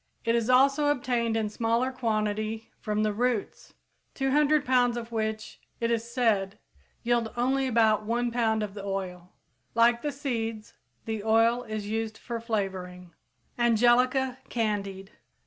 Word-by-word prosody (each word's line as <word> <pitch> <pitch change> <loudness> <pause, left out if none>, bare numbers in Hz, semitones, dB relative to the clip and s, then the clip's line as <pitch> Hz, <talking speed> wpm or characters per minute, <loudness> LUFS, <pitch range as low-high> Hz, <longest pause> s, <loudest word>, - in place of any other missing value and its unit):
It 230 - +2
is 235 0 0
also 275 +3 +4
obtained 240 -5 0
in 220 -1 0
smaller 230 +4 0
quantity 215 -2 -2
from 215 -1 -1
the 215 -1 +1
roots, 240 -1 -2 0.4
200 290 +2 +2
pounds 245 -2 +3
of 235 0 -6
which, 220 -1 -3 0.2
it 230 0 0
is 230 0 -1
said, 215 -6 +1 0.5
yield 235 -2 +1
only 265 +2 +1
about 220 -3 +3
one 240 +1 0
pound 220 -2 +1
of 205 -2 -5
the 200 -1 -8
oil. 185 -2 -5 0.4
Like 235 +1 +4
the 295 - -2
seeds, 230 -6 -4 0.3
the 220 -2 -3
oil 225 +2 +3
is 215 -2 -4
used 220 +1 -3
for 235 -1 -5
flavoring. 190 -5 -4 0.5
_Angelica 245 +3 +3
candied. 200 -4 -2
230 Hz, 140 wpm, -27 LUFS, 215-245 Hz, 0.5 s, also